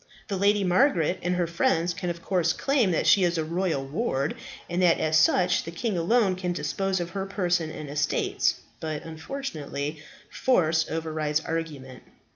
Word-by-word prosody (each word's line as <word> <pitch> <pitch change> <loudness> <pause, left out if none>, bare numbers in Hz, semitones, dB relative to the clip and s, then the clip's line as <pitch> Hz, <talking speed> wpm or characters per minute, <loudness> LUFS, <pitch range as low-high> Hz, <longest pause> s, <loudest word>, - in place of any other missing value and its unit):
The 200 - -1
Lady 200 +1 +3
Margaret 185 - +2
and 180 +1 0
her 180 -1 +1
friends 170 -1 +1
can 175 +1 -4
of 170 -1 -5
course 175 -4 +1
claim 270 -7 +1
that 170 - 0
she 195 - +5
is 175 -1 +1
a 160 - 0
royal 165 -4 -1
ward, 140 - -1 0.3
and 175 +1 -1
that 175 -2 +4
as 155 0 +1
such 175 +3 +4
the - - -7
king 195 +5 -2
alone 190 +3 +2
can 180 -1 -2
dispose 185 +5 -1
of 170 0 -4
her 195 -1 -3
person 180 -5 0
and 155 -1 -7
estates. 145 +1 0 0.2
But, 155 -2 -4
unfortunately, 160 - -5 0.3
force 160 -10 +2
overrides 155 -1 -1
argument." 155 -6 -5
170 Hz, 170 wpm, -26 LUFS, 155-190 Hz, 0.3 s, she